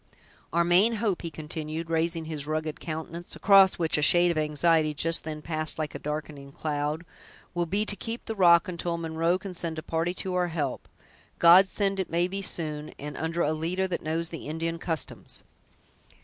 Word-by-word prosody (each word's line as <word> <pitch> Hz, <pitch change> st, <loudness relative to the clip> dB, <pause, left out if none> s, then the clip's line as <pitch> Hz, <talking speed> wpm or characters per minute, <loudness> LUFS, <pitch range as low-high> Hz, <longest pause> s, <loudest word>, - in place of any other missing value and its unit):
Our 170 Hz, +1 st, +3 dB
main 180 Hz, +7 st, +4 dB
hope," 210 Hz, -4 st, -1 dB
he 170 Hz, -, -4 dB
continued, 160 Hz, +1 st, -6 dB
raising 165 Hz, 0 st, 0 dB
his 150 Hz, -2 st, -5 dB
rugged 155 Hz, 0 st, -2 dB
countenance, 165 Hz, +2 st, -6 dB
across 195 Hz, -1 st, +6 dB
which 160 Hz, -3 st, +1 dB
a -, -, 0 dB
shade 175 Hz, +4 st, +5 dB
of 165 Hz, -, -3 dB
anxiety 155 Hz, 0 st, +2 dB
just 165 Hz, +2 st, +3 dB
then 155 Hz, -1 st, -6 dB
passed 155 Hz, -1 st, -2 dB
like 155 Hz, -1 st, -3 dB
a -, -, -6 dB
darkening 150 Hz, -2 st, -5 dB
cloud, 150 Hz, +2 st, -3 dB, 0.5 s
"will 175 Hz, -1 st, -1 dB
be 200 Hz, +5 st, 0 dB
to 205 Hz, -, 0 dB
keep 225 Hz, +4 st, -6 dB
the 225 Hz, -, -3 dB
rock 170 Hz, -4 st, +5 dB
until 170 Hz, -1 st, -3 dB
Munro 165 Hz, +1 st, 0 dB
can 190 Hz, 0 st, -7 dB
send 165 Hz, -2 st, -3 dB
a 155 Hz, -, -5 dB
party 165 Hz, +2 st, -1 dB
to 185 Hz, 0 st, -2 dB
our 180 Hz, -1 st, +1 dB
help! 150 Hz, -6 st, -3 dB, 0.5 s
God 180 Hz, +3 st, +7 dB
send 195 Hz, -1 st, 0 dB
it 190 Hz, -, -2 dB
may 170 Hz, +2 st, +1 dB
be 195 Hz, +2 st, -4 dB
soon 155 Hz, -5 st, -3 dB
and 145 Hz, 0 st, -7 dB
under 165 Hz, +1 st, -1 dB
a 155 Hz, -, +1 dB
leader 175 Hz, +4 st, -1 dB
that 175 Hz, -, -2 dB
knows 165 Hz, +1 st, -2 dB
the 165 Hz, -4 st, -7 dB
Indian 165 Hz, +2 st, -3 dB
customs!" 165 Hz, -2 st, -3 dB
165 Hz, 190 wpm, -27 LUFS, 155-175 Hz, 0.5 s, God